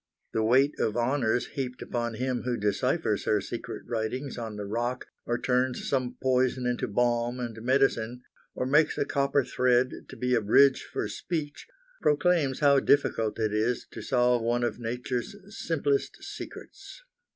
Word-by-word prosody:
The 110 - +1
weight 130 +6 +4
of 110 +1 0
honors 120 -1 +1
heaped 130 -3 -4
upon 120 -1 -3
him 125 +1 -1
who 125 -1 -2
deciphers 110 - 0
her 105 - +3
secret 115 +4 -6
writings 120 +4 -3
on 115 -3 -5
the 105 -1 -5
rock 120 +5 -2 0.2
or 120 - +1
turns 125 +1 0
some 130 -3 -1
poison 130 -1 +2
into 125 0 -1
balm 120 +2 0
and 115 -2 -5
medicine, 125 -1 +1 0.3
or 125 - -1
makes 150 +4 +3
a - - +1
copper 140 0 +1
thread 125 +1 +2 0.2
to - - -9
be 125 0 -1
a 120 - +3
bridge 135 +6 +5
for - - -2
speech, 155 -4 -4 0.3
proclaims 150 -2 +2
how 140 -1 +6
difficult 115 -7 +2
it 110 -2 0
is 110 +3 0
to - - -7
solve 125 -1 +2
one 120 +1 0
of 120 - -2
nature's 125 - -3
simplest 145 -8 -1
secrets. - - -9
125 Hz, 160 wpm, -28 LUFS, 120-135 Hz, 0.3 s, how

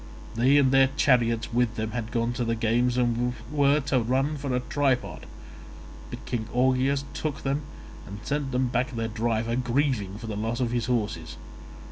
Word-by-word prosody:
They 130 +5 +4
and 135 -2 +4
their 135 0 +5
chariots 115 -4 +2
with 120 -1 +1
them 110 0 -3
had 115 -2 -4
gone 115 0 0
to 120 - -2
the 115 0 0
games 120 +2 +1
and 120 0 +1 0.2
were 145 0 +3
to 140 -1 +1
run 130 +6 0
for 140 -2 -4
a - - +2
tripod, 135 0 -1 0.8
but - - -8
King 110 -3 -3
Augeas 130 +2 +2
took 150 -3 -4
them, 140 +2 0 0.5
and 100 - -7
sent 145 +3 -2 0.2
back 125 0 -1
their 115 0 -1
driver 115 +1 -1
grieving 125 -5 0
for 115 - -8
the 110 -2 -4
loss 115 +3 -2
of 120 -2 0
his 120 -2 -1
horses. 105 -10 -2
125 Hz, 175 wpm, -26 LUFS, 115-135 Hz, 0.8 s, their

